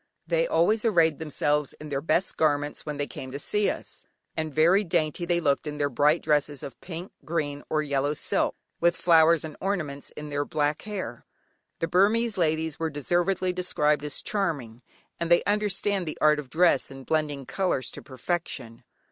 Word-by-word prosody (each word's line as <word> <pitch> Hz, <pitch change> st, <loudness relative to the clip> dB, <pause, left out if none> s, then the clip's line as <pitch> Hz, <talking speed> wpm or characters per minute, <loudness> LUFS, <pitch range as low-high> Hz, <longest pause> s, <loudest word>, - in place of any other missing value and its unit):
They -, -, +1 dB
always 210 Hz, -, +2 dB
arrayed 165 Hz, -9 st, +3 dB
themselves 150 Hz, -2 st, 0 dB
in 155 Hz, -, -10 dB
their 140 Hz, -1 st, -2 dB
best 170 Hz, +4 st, +1 dB
garments 145 Hz, -1 st, 0 dB
when 150 Hz, -1 st, -3 dB
they 145 Hz, -, -1 dB
came 130 Hz, -2 st, -8 dB
to 140 Hz, -, -4 dB
see 210 Hz, +8 st, +2 dB
us, -, -, -6 dB, 0.3 s
and 155 Hz, -1 st, -2 dB
very 170 Hz, +7 st, +4 dB
dainty 165 Hz, -1 st, 0 dB
they 170 Hz, 0 st, +2 dB
looked 145 Hz, -2 st, +1 dB
in 150 Hz, 0 st, -4 dB
their 145 Hz, -1 st, 0 dB
bright 150 Hz, +6 st, +3 dB
dresses 145 Hz, -1 st, +1 dB
of 140 Hz, -, -9 dB
pink, 175 Hz, +1 st, -7 dB
green, 145 Hz, -3 st, -2 dB
or 155 Hz, 0 st, +1 dB
yellow 145 Hz, 0 st, 0 dB
silk, -, -, +1 dB, 0.2 s
with 170 Hz, +1 st, +3 dB
flowers 165 Hz, -1 st, +5 dB
and 155 Hz, -, -8 dB
ornaments 155 Hz, -8 st, -3 dB
in 150 Hz, 0 st, -6 dB
their 145 Hz, 0 st, -1 dB
black 150 Hz, 0 st, -1 dB
hair. 185 Hz, -, -6 dB, 0.5 s
The 165 Hz, -, -1 dB
Burmese 215 Hz, +5 st, +3 dB
ladies 160 Hz, -3 st, 0 dB
are 165 Hz, 0 st, 0 dB
deservedly 175 Hz, +5 st, 0 dB
described 150 Hz, -5 st, +1 dB
as 150 Hz, -1 st, -3 dB
charming, 145 Hz, -, -2 dB, 0.4 s
and 170 Hz, 0 st, -2 dB
they 170 Hz, -, +5 dB
understand 205 Hz, -2 st, 0 dB
the 155 Hz, -, -4 dB
art 150 Hz, 0 st, +4 dB
of 140 Hz, -4 st, -8 dB
dress, 165 Hz, -2 st, +3 dB
and 135 Hz, -1 st, -10 dB
blending 150 Hz, -3 st, -1 dB
colours 180 Hz, -10 st, -1 dB
to -, -, -9 dB
perfection. 130 Hz, -4 st, -4 dB
155 Hz, 180 wpm, -26 LUFS, 145-175 Hz, 0.5 s, flowers